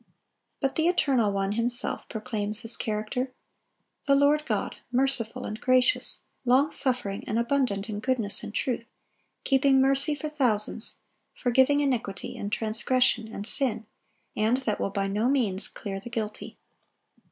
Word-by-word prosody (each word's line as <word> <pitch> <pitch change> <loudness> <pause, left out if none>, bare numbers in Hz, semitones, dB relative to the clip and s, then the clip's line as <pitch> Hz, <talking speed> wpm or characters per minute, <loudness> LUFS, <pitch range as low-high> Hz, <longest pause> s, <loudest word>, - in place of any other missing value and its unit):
But 270 -2 0
the 320 +1 +3
Eternal 265 - +2
One 195 0 -1
Himself 240 +3 -1
proclaims 215 -1 -1
His 230 -1 +1
character: 220 +4 -2 0.8
"The 280 - +5
Lord 290 +2 +3
God, 215 -5 -2
merciful 255 -1 0
and 215 +1 -6
gracious, 255 +9 +2 0.2
long 265 +4 +3
suffering, 250 -7 -1
and 215 - -1
abundant 235 -4 0
in 210 -2 -4
goodness 225 -3 +1
and - - -6
truth, 235 +1 -2 0.6
keeping 270 0 +4
mercy 275 +3 +4
for 290 +2 -5
thousands, 235 -7 0 0.4
forgiving 265 +3 +3
iniquity 240 -8 -2
and 205 - -5
transgression 230 +1 +1
and 210 -2 -7
sin, 230 -3 0 0.5
and 220 +4 +2
that 215 -5 -1
will - - 0
by 195 0 -1
no 210 +5 0
means 220 -8 +1
clear 195 -2 -6
the 210 - -9
guilty." 220 -3 -5
240 Hz, 140 wpm, -27 LUFS, 215-270 Hz, 0.8 s, The